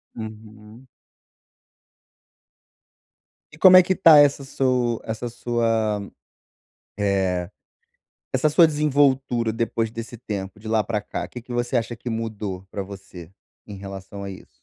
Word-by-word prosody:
Uhum. 110 +2 -11 2.7
E 155 - -14
como 185 +2 +8
é 185 - +10
que 185 - +1
está 165 -4 +7
essa 140 -1 +4
su 125 -4 0
essa 110 +2 -4
sua 115 -3 0 1.0
eh, 95 -3 0 0.8
essa 130 +4 +2
sua 165 +3 +6
desenvoltura 135 -6 +1
depois 115 0 -1
desse 115 +1 -7
tempo, 100 -3 -6
de 110 - -8
lá 110 -1 +2
pra 105 0 -2
cá? - - -5
O - - -9
que 125 - -9
que 125 - -10
você 120 +1 -1
acha 120 0 -2
que 120 - -7
mudou 105 -5 -4
pra 100 - -4
você, 95 -3 -11 0.3
em 105 - -9
relação 100 0 -8
a 100 - -5
isso? 95 - -11
115 Hz, 140 wpm, -23 LUFS, 100-125 Hz, 2.7 s, é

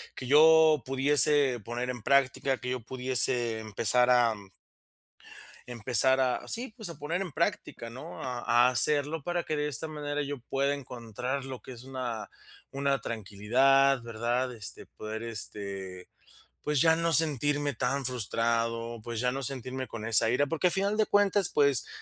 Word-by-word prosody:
que 130 - -7
yo 155 0 +6
pudiese 135 -1 +2
poner 120 +4 -4
en 125 -2 -5
práctica, 135 +1 +1
que 125 - -6
yo 130 -2 -3
pudiese 125 -2 0
empezar 110 +3 +1
a 120 -3 +4 1.3
empezar 125 +2 +2
a, 130 -1 0
sí, 235 -1 -2
pues, 220 -6 -5
a 170 - -8
poner 165 +6 -3
en 180 -5 -5
práctica, 115 - -3
¿no?, 125 +3 -9
a 125 -2 -4 0.2
a 125 - +5
hacerlo 145 +4 +1
para 175 0 -2
que 155 - -3
de 150 0 -1
esta 145 +4 -2
manera 145 -1 -4
yo 145 -1 -5
pueda 135 +3 -1
encontrar 125 0 -5
lo 130 -2 -7
que - - -11
es 120 0 -11
una 125 -4 -5 0.4
una 140 0 0
tranquilidad, 125 +6 +2
¿verdad?, 120 +2 -2
este, 110 -3 -6
poder, 110 +1 -7
este, 100 -4 -6 0.5
pues, 150 -2 0
ya 160 +1 +5
no 165 0 0
sentirme 145 -2 +2
tan 135 +4 -1
frustrado, 115 -1 -1
pues, 115 -1 -4
ya 125 - +1
no 135 +2 -4
sentirme 130 0 -4
con 110 -2 -8
esa 115 0 +4
ira. 140 +4 +2
Porque 165 +2 0
a - - -2
final 200 +2 0
de 215 - +2
cuentas, 205 -2 +3
pues, 140 -6 +2
130 Hz, 165 wpm, -28 LUFS, 115-145 Hz, 1.3 s, yo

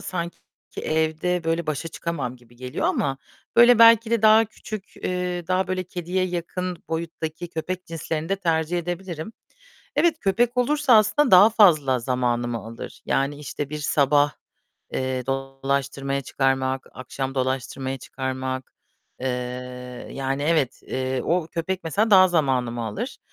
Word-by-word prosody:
sanki 170 -2 -4 0.4
evde 160 +3 0
böyle 165 0 0
başa 155 +2 -2
çıkamam 145 -8 -4
gibi 120 -1 -21
geliyor 125 +1 -3
ama, 135 -1 0 0.4
böyle, 240 0 +8
belki 230 0 +7
de 230 -2 +1
daha 220 +1 +7
küçük, 215 -2 -9
eee, 180 -1 -3
daha 185 +1 +1
böyle 185 0 -1
kediye 180 +1 -2
yakın 180 0 -3
boyuttaki 165 +1 -4
köpek 180 +2 -4
cinslerini 160 -1 -4
de 195 - +1
tercih 165 -2 0
edebilirim. 175 +2 -5 0.6
Evet, 340 -2 +4
köpek 235 +5 +1
olursa 285 +1 +3
aslında 215 +7 +3
daha 190 +4 +8
fazla 155 - +5
zamanımı 120 -1 -1
alır. 115 +1 -9
Yani, 140 +2 0
işte, 145 0 -5
bir 150 - -4
sabah, 145 0 +3 0.6
eee, 130 -1 -2
dolaştırmaya 135 +1 -2
çıkarmak, 130 0 0
akşam 135 +1 -5
dolaştırmaya 130 0 -2
çıkarmak... 130 0 -4 0.5
Eee, 130 - -1 0.8
yani 135 +1 -2
evet, 150 -4 +1
eee, 130 0 -2
o 170 -1 +1
köpek 175 +2 -3
mesela 210 +7 +1
daha 185 -1 +8
zamanımı 125 -8 0
alır. 105 - -5
160 Hz, 135 wpm, -24 LUFS, 135-185 Hz, 0.8 s, böyle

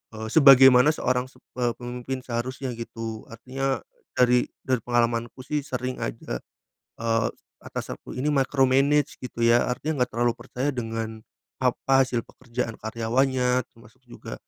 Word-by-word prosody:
eee, 110 0 -5
sebagaimana 135 -1 +8
seorang 125 -2 0
sep - - -23 0.2
eee, 120 -1 +1
pemimpin 125 +1 -5
seharusnya, 125 +2 -3
gitu. 115 -1 -6
Artinya, 130 +4 -3 0.3
dari 125 0 +4 0.2
dari 130 -2 +1
pengalamanku 120 +1 -1
sih 150 +2 -1
sering 130 -2 -4
aja, - - -4 0.6
eee, 115 0 +1 0.3
atas - - -6
aku - - -14
ini 135 - -1
micromanage, 135 +1 +2
gitu 125 - -8
ya. 120 +1 +5
Artinya 150 +4 -2
enggak 125 - -1
terlalu 120 0 +3
percaya 130 +3 -2
dengan, 115 -2 -4 0.4
apa, 135 +1 +3
hasil 120 -2 -2
pekerjaan 115 -1 -5
karyawannya, 125 +3 +1
termasuk 115 +1 -19
juga, 120 - -9
125 Hz, 135 wpm, -25 LUFS, 115-130 Hz, 0.6 s, sebagaimana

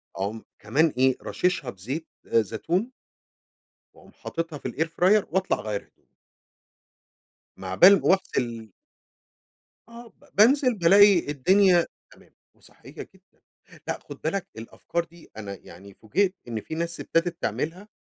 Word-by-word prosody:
أقوم 105 +3 -4 0.2
كمان 145 +9 +1
إيه 130 0 +3
راشِشها 180 -8 -1
بزيت 130 - -6 0.2
زيتون. 160 - -1 1.0
وأقوم - - -19
حاطِطها 165 -2 -5
في - - -5
الair 160 +2 -1
fryer 185 +5 +3
وأطلع 190 0 0
أغيّر 105 -2 -4
هدومي. - - -34 1.6
م 95 - -10
عبال 180 - +6
ما - - +4
رُحت 190 - -2
ال 115 -4 -3 1.2
آه 235 0 -12
ب - - -23
بانزل 250 +4 +4
بالاقي 195 +2 +6
الدنيا 180 +4 +4 0.3
تمام - - -21 0.2
وصحيّة - - -18 0.2
جدًا، - - -28 0.5
لأ - - -3
خُد - - -12
بالك 175 +4 -2
الأفكار 165 +9 -4
دي 170 0 -18
أنا 100 -2 -6
يعني 95 +3 -14
فوجئت 185 - -1
إن 110 -2 -4
في 160 - -7
ناس 170 0 -4
ابتدت 165 0 -1
تعملها، 180 +7 -3
165 Hz, 135 wpm, -25 LUFS, 115-190 Hz, 1.6 s, عبال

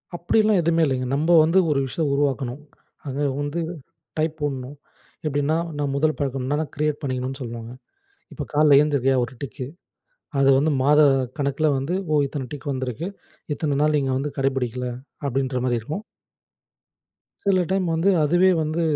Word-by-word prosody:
அப்படிலாம் 210 +3 +3
எதுவுமே 165 0 +2
இல்லைங்க. 130 -3 -1
நம்ப 160 +4 +1
வந்து 170 +4 +4
ஒரு 145 -2 +2
விஷயம் 150 +2 -1
உருவாக்கணும். 140 -2 -1 0.5
அங்கே 140 +2 -1 0.2
வந்து 145 +4 -2 0.6
டைப் 155 0 0
போடணும். 140 -1 -4 0.5
எப்படின்னா 145 +1 +1 0.2
நான் 145 -2 -1
முதல் 155 +2 +1
பழக்கம்னா 135 0 -1
நான் 155 - -6
கிரியேட் 150 0 -1
பண்ணிக்கணும்னு 130 -1 -3
சொல்லுவாங்க. 115 -1 -6 0.6
இப்போ 145 - -5
காலில 145 -1 +6
எழுந்தருக்கையா 140 -3 +2
ஒரு 120 - -9
டிக்கு. 130 -1 -5 0.7
அது 135 0 +4
வந்து 150 +3 +2
மாத 150 +3 +5 0.4
கணக்கில 140 +2 0
வந்து, 140 +7 -2 0.2
ஓ! - - +3
இத்தன 135 -2 -5
டிக் 145 0 -5
வந்திருக்கு 130 +5 -3 0.5
இத்தன 145 -2 -1
நாள் 150 0 +3
நீங்க 135 -2 0
வந்து 145 +2 -2
கடை 135 0 +2
பிடிக்கல, 125 0 -2 0.4
அப்படின்ற 130 -1 -1
மாரி 120 -2 +1
இருக்கும். 155 - -5 1.4
சில 195 -2 +4
டைம் 190 -1 +1
வந்து, 165 +5 +2
அதுவே 175 +5 +4
வந்து 155 +2 -1
145 Hz, 150 wpm, -23 LUFS, 135-155 Hz, 1.4 s, காலில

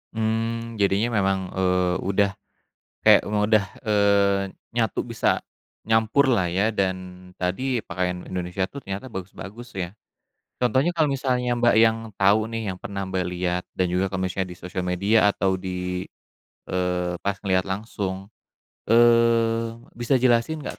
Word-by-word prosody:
Hmm, 115 +1 -2
jadinya 100 +4 +2
memang, 95 -1 +1
eee, 90 -1 +1
udah 100 +1 +1 0.7
kayak - - +7
udah, 105 0 +3 0.2
eee, 100 -2 +3 0.3
nyatu 115 -3 0
besa - - 0 0.4
nyampur 110 +5 +3
lah 95 -6 +2
ya, 100 +4 +2
dan 95 -3 0 0.4
tadi 115 +8 -1
pakaian 90 0 -3
Indonesia 90 +1 -2
tuh 140 - -8
ternyata 100 +7 -5
bagus-bagus 100 +5 -8
ya. 90 -1 -3 0.7
Contohnya 130 +6 +2
kalo 160 -3 +2
misalnya 130 -3 0
Mbak, 120 0 +3
yang 115 0 +5 0.2
tau 100 +3 +4
nih, 115 -4 -3
yang 90 - -10
pernah 100 0 -4
Mbak 95 -1 -1
liat, 90 0 -1
dan 90 - +2
juga 95 +2 +1
kalo 95 0 -1
misalnya 95 0 -3
di 90 - -11
sosial 90 0 -5
media 100 +4 +3
atau 95 -1 0
di, 90 0 -4 0.7
eee, 90 -1 -1
pas 100 0 -1
ngeliat 95 -2 +2
langsung, 95 -1 -4 0.6
eee, 115 -1 +4 0.2
bisa 120 +3 0
jelasin 125 +5 +2
nggak - - -6
100 Hz, 140 wpm, -24 LUFS, 95-115 Hz, 0.7 s, kayak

